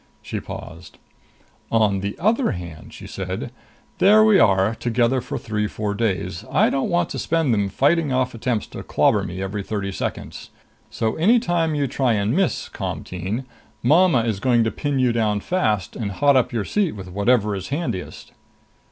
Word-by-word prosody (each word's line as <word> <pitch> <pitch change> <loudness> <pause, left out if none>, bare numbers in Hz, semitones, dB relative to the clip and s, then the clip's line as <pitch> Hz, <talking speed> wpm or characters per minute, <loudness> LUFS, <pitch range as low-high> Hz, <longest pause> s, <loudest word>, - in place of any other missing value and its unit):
She - - -4
paused. 85 +2 -10 0.7
"On 105 -4 +2
the 100 +1 -4
other 220 - +1
hand," 85 -4 -9
she - - -11
said, - - -5 0.5
"there 215 +3 +6
we 210 -3 +5
are 100 - +4
together 120 +2 +1
for 125 - -5
three 105 -1 -2
four 105 -1 -3
days. 105 -3 -2
I - - +3
don't 135 - -1
want 175 -1 0
to - - -4
spend 165 -7 +1
them 100 -2 +1
fighting 145 - +2
off 130 -1 0
attempts 115 -1 -2
to - - -7
clobber 105 - +2
me 95 0 -5
every 100 +1 -3
thirty 100 -1 -3
seconds. - - -5 0.4
So 110 -1 -2
any 210 +10 +5
time 170 -7 0
you 145 -1 +1
try 130 -2 +1
and 105 +1 0
miss, 190 -1 0
Comteen, 95 +8 -4 0.4
mama 155 -1 +4
is 110 -4 -1
going 120 0 +3
to 110 - 0
pin 145 -2 -2
you 125 -2 +2
down 110 -3 +1
fast, 105 - -1
and 105 -4 -3
hot 140 +6 +3
up 130 - +2
your 115 -5 -2
seat 200 - 0
with 95 -3 -8
whatever 105 +2 +2
is 95 -1 -5
handiest." 140 - -4
115 Hz, 180 wpm, -22 LUFS, 100-145 Hz, 0.7 s, there